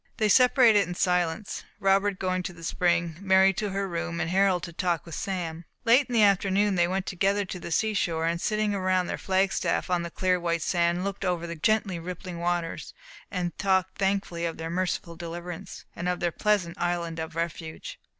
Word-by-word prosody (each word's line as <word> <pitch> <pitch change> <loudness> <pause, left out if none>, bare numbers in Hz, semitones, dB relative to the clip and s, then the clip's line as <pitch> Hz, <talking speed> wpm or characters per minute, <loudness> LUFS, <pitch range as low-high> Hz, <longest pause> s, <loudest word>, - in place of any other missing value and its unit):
They 215 -2 +2
separated 235 -5 +5
in 180 - -5
silence, 180 +1 0 0.2
Robert 195 0 +2
going 185 -1 -1
to 180 - -5
the 165 -1 -13
spring, 170 -1 0
Mary 190 0 +5
to 205 +2 -2
her 195 0 -2
room, 170 -1 -3
and 165 0 -1
Harold 190 -2 +3
to 170 - -6
talk 170 -2 -1
with 165 - -9
Sam. 170 -3 -4 0.2
Late 245 +4 +5
in - - -4
the 225 -2 +5
afternoon 200 0 +3
they 175 -2 +3
went 190 +1 -2
together 195 +2 0
to 185 0 -6
the 170 - -7
seashore, 170 -4 0
and 170 +1 -1
sitting 215 -1 0
around 185 -2 +1
their - - -4
flag 190 0 +1
staff, - - -1
on 175 -1 +2
the 170 - -4
clear 185 +1 +1
white 170 -2 -1
sand, 175 0 +1
looked 200 0 -4
over 175 -2 -1
the 170 0 -5
gently 195 +1 +1
rippling 175 0 -7
waters, 175 -1 -2 0.3
and 180 -2 -3
talked 190 -2 +1
thankfully 195 -3 0
of 165 -1 -2
their 165 0 -5
merciful 175 -1 -2
deliverance, 175 +2 -7
and 175 +1 -2
of 180 - -1
their 175 -1 0
pleasant 200 -3 0
Island 170 -2 -1
of 160 0 -5
Refuge. 165 -1 -5
180 Hz, 200 wpm, -27 LUFS, 170-195 Hz, 0.3 s, separated